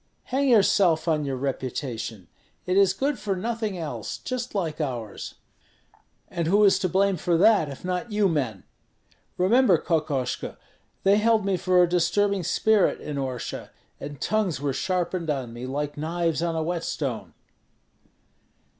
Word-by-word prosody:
"Hang 270 +2 0
yourself 195 -7 +4
on 155 -2 +1
your 135 -1 -2
reputation; 125 - -4 0.4
it 185 - 0
is 195 -1 +5
good 270 +8 -1
for 200 -2 -1
nothing 220 0 -3
else, 160 -3 -5
just 250 -3 -5
like 165 -5 -2
ours." 120 -8 -5 0.9
"And 170 -3 -3
who 205 +5 +4
is 200 - +5
to 185 - 0
blame 195 +1 +2
for 170 +1 +1
that, 195 -4 +4
if 140 +5 -9
not 185 +5 -2
you 210 -1 +3
men? 130 - -2 0.7
Remember, 195 +1 +4
Kokoshko, 150 -7 -2 0.5
they 195 +1 +5
held 220 -1 +3
me 195 -1 +1
for 180 0 +3
a - - +3
disturbing 190 +3 +1
spirit 215 +4 +2
in 150 -1 -5
Orsha, 130 -3 -4 0.3
and 145 -1 -7
tongues 205 -10 0
were 140 -1 -1
sharpened 180 +1 -1
on 130 -5 -2
me 120 +2 -6
like 145 +2 -3
knives 165 +1 -1
on 170 -1 -1
a 160 - 0
whetstone." 155 -7 -3
175 Hz, 150 wpm, -25 LUFS, 145-200 Hz, 0.9 s, is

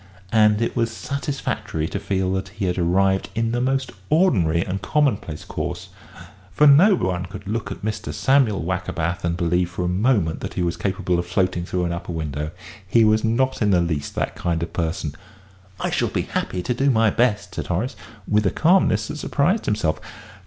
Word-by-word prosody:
And 105 0 +4
it - - -2
was 115 -1 +1
satisfactory 135 - -3
to 100 - -3
feel 95 -2 -1
that 95 0 -2
he 105 0 -4
had 90 0 -1
arrived 95 +3 +2
in 115 0 0
the 120 +1 0
most 130 0 0 0.2
ordinary 95 - +3
and 95 +1 -3
commonplace 125 - 0
course, - - -5 0.6
for 150 - +3
no 165 +8 +7
one 90 - -2
could 100 +2 -9
look 110 -1 -3
at 100 - -7
Mr. 110 0 -3
Samuel 130 - +2
Wackerbath 85 -1 -2
and 85 0 -1
believe 90 0 +1
for 90 0 -3
a - - 0
moment 95 -3 +1
that - - -6
he 90 - 0
was 85 -1 0
capable 95 -3 -1
of 85 - -3
floating 90 -1 0
through 90 0 -1
an 85 - -1
upper 85 +1 -5
window; 75 -2 -3 0.4
he 115 +4 +4
was 110 0 +3
not 125 +4 +1
in 105 - +3
the 90 -3 +4
least 80 -4 -2
that - - -1
kind 85 -1 -2
of 85 - -6
person. 80 -2 -2 0.7
"I - - -1
shall - - +1
be - - -1
happy 90 -1 -3
to 125 - 0
do 135 +3 +1
my 115 -3 +3
best," 115 -3 +1
said - - -4
Horace, 100 +9 -1 0.3
with 105 -1 +2
a - - +4
calmness 160 - +3
that - - -5
surprised 165 +8 0
himself. 105 -7 0
95 Hz, 195 wpm, -22 LUFS, 85-115 Hz, 0.7 s, no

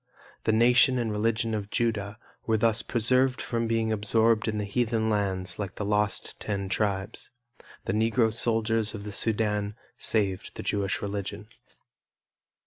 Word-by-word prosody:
The - - +3
nation 120 +3 +4
and 115 -3 -1
religion 115 +2 0
of 105 -2 -3
Judah 110 -3 -1 0.3
were 110 -1 +3
thus 115 0 +2
preserved 125 +3 +1
from 115 -1 -2
being 115 -1 0
absorbed 110 +1 +2
in 105 -1 -1
heathen 110 +1 0
lands 95 -3 -1
like 100 -2 -4
the 105 - -4
lost 105 -1 -1
Ten 100 -2 -3
Tribes. 95 -1 -2 0.6
The - - -1
Negro 110 +1 +2
soldiers 115 -2 +1
of 100 - -7
the 105 - -6
Sudan 105 -2 0 0.2
saved 100 -4 0
the - - -6
Jewish 100 -1 -1
religion. 100 +1 -5
110 Hz, 140 wpm, -27 LUFS, 105-115 Hz, 0.6 s, nation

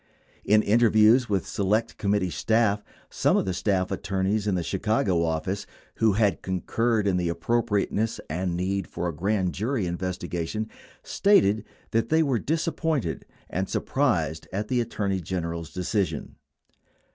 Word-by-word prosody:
In 105 +1 +4
interviews 110 +2 +5
with 100 -3 0
Select 110 +3 0
Committee 100 -3 +1
staff, 110 -1 +1 0.3
some - - +2
of - - +1
the 95 - -1
staff 95 0 0
attorneys 100 +2 -1
in 100 - +2
the 90 - -1
Chicago 95 -2 +1
office 85 +4 -2 0.3
who 110 -2 +3
had 105 -1 +2
concurred 110 +4 0
in 95 -2 +2
the 90 -1 0
appropriateness 110 +4 0
and 85 +2 -2
need 95 +1 -1
for 90 - -3
a 85 - -2
grand 95 +2 0
jury 110 0 -1
investigation 90 +3 -3 0.3
stated 110 - +3 0.3
that 115 0 +1
they 160 +1 +4
were 135 -6 +1
disappointed 155 - -1 0.2
and 95 +2 -3
surprised 85 - 0
at 105 +3 -3
the 125 -2 +2
Attorney 100 -4 -2
General's 85 -2 -4
decision. 90 -3 -2
100 Hz, 140 wpm, -26 LUFS, 90-110 Hz, 0.3 s, interviews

